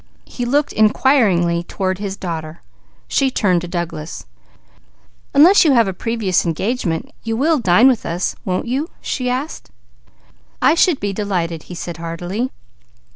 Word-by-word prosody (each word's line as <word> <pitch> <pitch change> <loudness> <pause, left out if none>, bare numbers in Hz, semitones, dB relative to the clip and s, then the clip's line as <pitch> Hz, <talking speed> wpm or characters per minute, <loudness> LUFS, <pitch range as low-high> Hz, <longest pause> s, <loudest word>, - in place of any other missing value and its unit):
He 245 - -5
looked 285 +4 +1
inquiringly 210 -7 +3
toward 185 +1 -3
his 200 -1 -4
daughter. 160 -3 -6 0.4
She 270 -1 +2
turned 185 -8 +1
to 180 - -6
Douglas. 170 -3 -5 1.1
"Unless 345 +8 +7
you 305 -4 +4
have 230 -4 +4
a 190 - -2
previous 215 -2 0
engagement, 170 0 -2
you 225 0 -2
will 305 +4 +2
dine 215 +3 +5
with 255 -4 +2
us, 170 +2 -2
won't 185 -1 -2
you?" 270 +7 -2
she 250 -2 -3
asked. 265 +5 -4 0.9
"I - - +4
should 335 -2 +3
be 205 -1 -2
delighted," 175 -6 -2
he 180 - -7
said 170 -1 -6
heartily. 175 +8 -4
200 Hz, 145 wpm, -19 LUFS, 175-255 Hz, 1.1 s, Unless